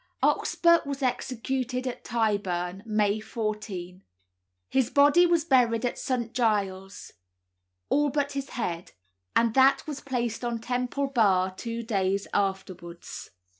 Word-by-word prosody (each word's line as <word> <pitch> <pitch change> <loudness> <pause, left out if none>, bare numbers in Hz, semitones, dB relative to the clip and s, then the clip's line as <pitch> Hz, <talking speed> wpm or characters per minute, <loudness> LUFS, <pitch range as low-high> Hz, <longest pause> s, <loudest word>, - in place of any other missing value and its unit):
Oxburgh 340 -1 +3
was 280 -1 -4
executed 255 0 -2
at 255 - -5
Tyburn, 195 -5 -1
May 210 -1 +1
14; 210 -5 -5 0.7
his 265 -3 +1
body 290 +5 +5
was 340 -2 +2
buried 250 -5 +3
at 245 - -2
St. 240 -3 -2
Giles', 200 -4 -1 0.8
all 295 0 +2
but 285 0 -1
his 275 -1 -4
head, 175 -7 -3 0.4
and 230 -1 +3
that 270 +2 +4
was 295 -3 -6
placed 240 -4 -3
on 240 -1 -1
Temple 250 +4 -2
Bar 195 -8 +2
two 230 +3 -5
days 195 -3 0
afterwards. 185 -3 -4
230 Hz, 125 wpm, -27 LUFS, 200-265 Hz, 0.8 s, body